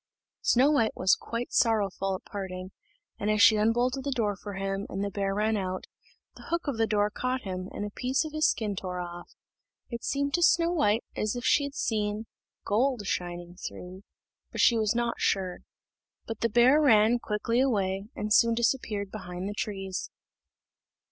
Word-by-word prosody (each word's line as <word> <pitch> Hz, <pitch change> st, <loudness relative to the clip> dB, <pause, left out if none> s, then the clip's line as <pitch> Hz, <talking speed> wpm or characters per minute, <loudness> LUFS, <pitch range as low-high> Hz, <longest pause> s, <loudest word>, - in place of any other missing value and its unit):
Snow 265 Hz, +5 st, +4 dB
white 230 Hz, -7 st, +2 dB
was 185 Hz, +1 st, +4 dB
quite 235 Hz, +1 st, -5 dB
sorrowful 195 Hz, -4 st, +1 dB
at -, -, -9 dB
parting, 185 Hz, -2 st, -6 dB, 0.5 s
and 210 Hz, -, -1 dB
as 215 Hz, 0 st, +2 dB
she 225 Hz, 0 st, +7 dB
unbolted 240 Hz, +5 st, +1 dB
the 285 Hz, -, -2 dB
door 225 Hz, -6 st, 0 dB
for 200 Hz, +1 st, -8 dB
him, 195 Hz, +1 st, -3 dB
and 195 Hz, +1 st, -3 dB
the 200 Hz, -, -2 dB
bear 195 Hz, 0 st, -1 dB
ran 215 Hz, +1 st, +1 dB
out, 185 Hz, -2 st, -3 dB, 0.5 s
the -, -, -12 dB
hook 340 Hz, +1 st, -1 dB
of 275 Hz, -5 st, -1 dB
the 225 Hz, -, +3 dB
door 210 Hz, -1 st, +1 dB
caught 255 Hz, +2 st, -2 dB
him, 185 Hz, -1 st, -5 dB
and 205 Hz, -, -4 dB
a 205 Hz, -, -6 dB
piece 260 Hz, +7 st, 0 dB
of 310 Hz, -, -7 dB
his 310 Hz, 0 st, +3 dB
skin 210 Hz, -3 st, -1 dB
tore 180 Hz, -1 st, -4 dB
off; 175 Hz, 0 st, -8 dB, 0.6 s
it 235 Hz, 0 st, -5 dB
seemed 280 Hz, 0 st, -1 dB
to 350 Hz, -, +2 dB
Snow 335 Hz, 0 st, +4 dB
white 225 Hz, -10 st, +2 dB
as 215 Hz, +2 st, -1 dB
if 245 Hz, -, -5 dB
she 285 Hz, -, +4 dB
had 280 Hz, 0 st, -7 dB
seen 210 Hz, 0 st, -1 dB, 0.4 s
gold 235 Hz, +1 st, +1 dB
shining 175 Hz, -1 st, -4 dB
through, 185 Hz, +1 st, -8 dB, 0.5 s
but -, -, -6 dB
she 235 Hz, -, +5 dB
was 220 Hz, 0 st, +1 dB
not 235 Hz, 0 st, -1 dB
sure. 185 Hz, -2 st, 0 dB, 0.7 s
But 225 Hz, -1 st, -6 dB
the 230 Hz, -, +1 dB
bear 245 Hz, +7 st, +5 dB
ran 230 Hz, -3 st, +5 dB
quickly 230 Hz, +2 st, -1 dB
away, 200 Hz, -6 st, 0 dB
and 210 Hz, 0 st, -1 dB
soon 230 Hz, 0 st, +5 dB
disappeared 225 Hz, -4 st, -1 dB
behind 180 Hz, -3 st, -6 dB
the 205 Hz, -, -3 dB
trees. 195 Hz, -3 st, -4 dB
215 Hz, 185 wpm, -28 LUFS, 195-240 Hz, 0.7 s, she